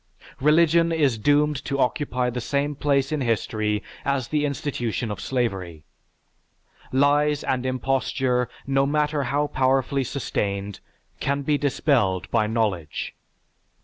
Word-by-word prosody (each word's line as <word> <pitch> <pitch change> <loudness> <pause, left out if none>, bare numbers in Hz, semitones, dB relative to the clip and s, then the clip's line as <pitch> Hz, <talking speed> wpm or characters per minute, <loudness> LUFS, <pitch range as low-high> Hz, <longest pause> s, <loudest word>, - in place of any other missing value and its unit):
Religion 165 +3 +4
is 145 -8 +2
doomed 145 +3 +2
to 140 - -2
occupy 125 -1 0
the 125 +1 -4
same 140 +4 -1
place 140 -1 +1
in 155 -2 -1
history 110 -3 0 0.2
as 135 -3 -1
the 150 -1 +1
institution 125 -5 -3
of 105 - -5
slavery. 95 - -2 1.1
Lies 145 +2 +3
and 130 0 -1
imposture, 130 -1 0 0.2
no 135 0 +2
matter 150 0 +1
how 145 +4 +1
powerfully 135 0 +1
sustained, 100 -6 -3 0.4
can 140 +1 -1
be 150 +1 +2
dispelled 130 - +1
by 105 - +2
knowledge. 105 -9 -2
135 Hz, 120 wpm, -24 LUFS, 115-145 Hz, 1.1 s, Religion